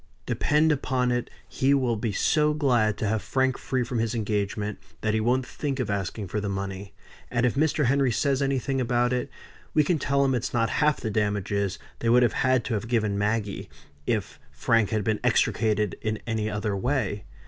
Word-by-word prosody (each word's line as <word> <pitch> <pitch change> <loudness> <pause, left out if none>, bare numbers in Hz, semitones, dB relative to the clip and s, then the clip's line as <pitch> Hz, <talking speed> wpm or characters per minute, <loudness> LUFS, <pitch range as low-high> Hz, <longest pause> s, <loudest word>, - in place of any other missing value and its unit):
Depend 150 +2 +2
upon 130 -3 0
it 120 0 -1 0.2
he 135 +2 +2
will 125 -4 +1
be 110 0 -2
so 150 +8 +2
glad 120 -8 +2
to 110 - -1
have 110 0 0
Frank 130 -1 +1
free 130 -1 -1
from 120 0 -3
his 115 +1 -1
engagement, 105 -1 -2 0.2
that 110 -1 0
he 110 - +2
won't 125 +4 +1
think 140 -1 -4
of 120 -5 -1
asking 100 +1 -3
for 105 +4 -2
the 100 - -2
money. 100 0 -5 0.3
And 120 0 +1
if 125 - +2
Mr. 150 +1 +1
Henry 135 0 +3
says 135 +3 +1
anything 135 -1 0
about 120 0 +1
it, 125 - -1 0.5
we 150 - +5
can 160 +2 +1
tell 140 +1 +2
him 135 - +2
it's 120 0 -2
not 115 -1 +1
half 150 -1 +3
the 110 - -3
damages 100 -2 -1 0.2
they 115 - 0
would 125 +1 +6
have 120 - +2
had 130 -3 +2
to 120 - -2
have 110 +2 -2
given 110 -4 +1
Maggie, 105 0 -1 0.4
if - - -2
Frank 115 -3 +2
had 110 -2 0
been 110 0 0
extricated 105 -2 +1
in 110 0 -1
any 110 -2 -1
other 105 -1 -2
way. 105 -3 -1
115 Hz, 200 wpm, -26 LUFS, 105-130 Hz, 0.5 s, would